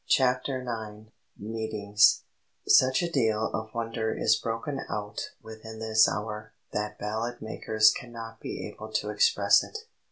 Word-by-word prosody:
CHAPTER 130 0 +2
IX 110 -2 -6 0.3
MEETINGS 110 -1 +2 0.4
"Such 130 +5 +5
a 170 - -2
deal 110 -6 +1
of 110 0 -4
wonder 115 -1 -2
is 110 - +4
broken 115 +6 -3
out 105 0 -4
within 110 0 -9
this 110 0 +4
hour 105 0 -5 0.2
that 105 0 -2
ballad 110 +4 -3
makers 110 0 +3
cannot 115 -2 -8
be - - -5
able - - -10
to - - 0
express 470 -1 +4
it." 445 0 -8
110 Hz, 135 wpm, -28 LUFS, 110-120 Hz, 0.4 s, Such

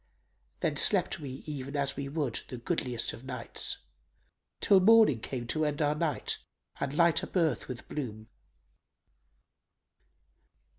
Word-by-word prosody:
Then - - 0
slept - - +4
we 135 -3 -7
even 140 -2 -5
as 140 -1 0
we 140 -1 -4
would 140 -6 -1
the 125 - -6
goodliest 125 -3 -1
of 115 - -10
nights 125 -3 -3 0.4
* - - -46
Till 195 - +5
morning 215 - +6
came 120 +1 -4
to 155 +4 0
end 150 -1 -1
our 150 -1 +2
night 150 -2 -1 0.4
and 140 - -1
light 170 +1 +4
up - - -8
earth 160 -9 +1
with 125 -2 -7
bloom." 110 -7 -5
140 Hz, 140 wpm, -30 LUFS, 125-155 Hz, 0.4 s, morning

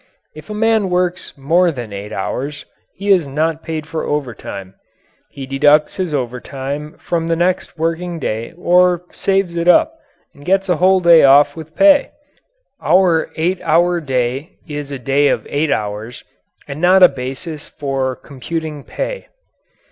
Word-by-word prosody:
If 155 +4 -13
a 210 - -5
man 220 -2 +2
works 180 -1 -2
more 170 +6 +2
than 120 -7 -7
eight 100 +1 -7
hours 140 +8 -4 0.3
he 200 +1 -1
is 175 -6 +3
not 155 +3 -1
paid 160 -2 -5
for 160 0 -4
overtime 115 -9 -5 0.6
he 135 - -8
deducts 145 +5 +3
his 185 -4 -2
overtime 135 +3 -4
from 165 -1 -2
the 165 - +1
next 175 +1 -1
working 165 +2 -2
day 115 -6 -4
or 180 0 +3
saves 195 -3 -1
it 170 0 -2
up 180 - +5 0.4
and 145 - -16
gets 195 +3 +1
a 175 - +2
whole 185 +2 +4
day 170 -2 +6
off 145 +1 +5
with 160 -1 -10
pay. 290 -1 +5 0.7
Our 180 -3 +3
eight 175 +3 -1
hour 175 +2 +2
day 130 +1 -2
is 145 -2 -6
a 140 - -4
day 135 +3 +1
of - - 0
eight 145 +1 -1
hours 105 +3 -4 0.4
and 145 +2 -7
not 185 +1 +5
a - - +11
basis 140 +4 -7
for 135 -2 -3
computing 150 +2 -6
pay. - - -5
155 Hz, 155 wpm, -17 LUFS, 135-180 Hz, 0.7 s, a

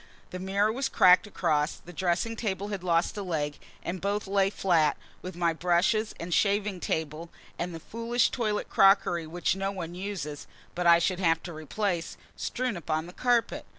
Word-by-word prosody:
The 185 - -5
mirror 200 +3 +1
was 265 +4 -2
cracked 185 0 +6
across; 150 -6 0
the 175 - -13
dressing 180 +6 0
table 205 -3 -3
had 200 -3 -4
lost 170 +1 +1
a - - -2
leg; 150 -6 -2 0.2
and 180 +1 -4
both 205 +1 -1
lay 195 0 +2
flat, 170 -6 +2 0.2
with 185 -1 -7
my 170 -1 +1
brushes 180 +6 +1
and 170 +1 -4
shaving 200 -1 +1
table, 160 0 -3 0.3
and 175 -1 -3
the - - -6
foolish 230 +6 0
toilet 215 -4 -1
crockery 195 -4 +4
which 175 +3 0
no 195 0 -2
one 175 -3 -6
uses 175 -6 -5 0.3
(but 180 -1 0
I 170 0 +8
should 180 +2 0
have 165 -3 +2
to 175 - -7
replace) 170 +3 -3 0.2
strewn 250 -5 -2
upon 160 -1 -2
the 175 - -11
carpet. 245 0 +1
180 Hz, 180 wpm, -28 LUFS, 170-205 Hz, 0.3 s, I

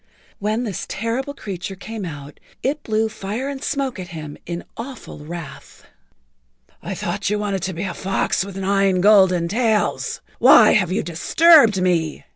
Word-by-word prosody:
When 215 +4 -1
this 205 -7 -4
terrible 255 +6 -3
creature[Pg 190 -4 -6
48] - - -29
came 215 -1 -6
out 145 -3 -9 0.2
it 290 +3 -1
blew 220 -2 0
fire 215 +4 -5
and 280 0 -5
smoke 275 -7 -2
at 180 - -6
him 155 -4 -8
in 170 0 -4
awful 250 - -8
wrath. 155 -1 -10 1.0
"I - - -5
thought - - -3
you 210 - 0
wanted 200 -2 -2
to 190 +1 -3
be 170 +3 -4
a 190 - -3
fox 195 0 -1
with 195 -1 -8
nine 195 -1 +1
golden 190 -4 +5
tails. 220 +2 0 0.2
Why - - +7
have 185 -5 +2
you 185 - 0
disturbed 225 - +5
me?" 170 -4 0
195 Hz, 165 wpm, -21 LUFS, 175-225 Hz, 1.0 s, Why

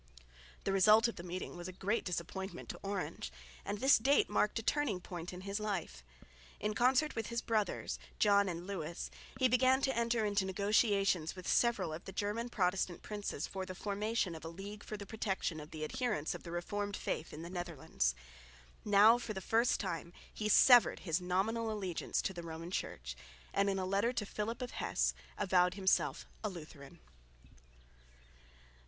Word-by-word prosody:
The - - 0
result 215 +4 +6
of 235 - -5
the - - -5
meeting 180 +1 -5
was 175 0 -6
a - - -5
great 200 +5 -1
disappointment 185 +2 -4
to - - -6
Orange, 195 - -4 0.3
and 205 - -3
this 265 +3 +5
date 275 +5 +3
marked 210 - +2
a 225 - -2
turning 270 -8 +1
point 175 -1 -6
in 180 0 -8
his 200 +2 -3
life. 190 - -3 0.6
In 210 +1 -1
concert 255 +7 +3
with 225 -1 -2
his 235 0 -2
brothers, 215 -3 -1 0.2
John 200 -2 +4
and 175 0 -5
Lewis, 175 -4 -4 0.3
he 260 -1 +4
began 255 +2 +4
to 265 -2 +1
enter 235 -1 +1
into 205 -1 +1
negotiations 195 -3 +2
with 185 -2 -8
several 205 -9 +2
of 160 - -7
the - - -6
German 210 +5 -2
Protestant 180 -4 0
princes 205 -7 -4
for 190 -1 -5
the 185 0 -6
formation 205 -1 -1
of 160 - -9
a - - -5
league 200 +5 -8
for 215 - -6
the 200 - -7
protection 195 -6 -2
of 150 0 -9
the 155 -1 -6
adherents 210 - -1
of - - -7
the 170 - -9
reformed 200 +4 -3
faith 155 - -3
in 155 - -7
the 170 - -7
Netherlands. 160 - -1 0.7
Now 210 +3 +6
for 230 -2 -4
the 190 - -4
first 225 +5 +2
time 170 -2 -4 0.2
he 210 -1 -2
severed 245 +2 +7
his 170 0 0
nominal 215 +6 0
allegiance 190 -5 -2
to 190 - -1
the 175 - -6
Roman 165 +1 -7
Church, - - -4 0.4
and 200 0 +2
in 195 - 0
a 190 - -1
letter 200 +6 +1
to 215 - -1
Philip 220 +5 -3
of 245 - -5
Hesse - - 0 0.2
avowed 180 -1 +3
himself 190 -1 +1 0.2
a 215 - 0
Lutheran. 155 -6 -10
195 Hz, 180 wpm, -34 LUFS, 175-220 Hz, 0.7 s, severed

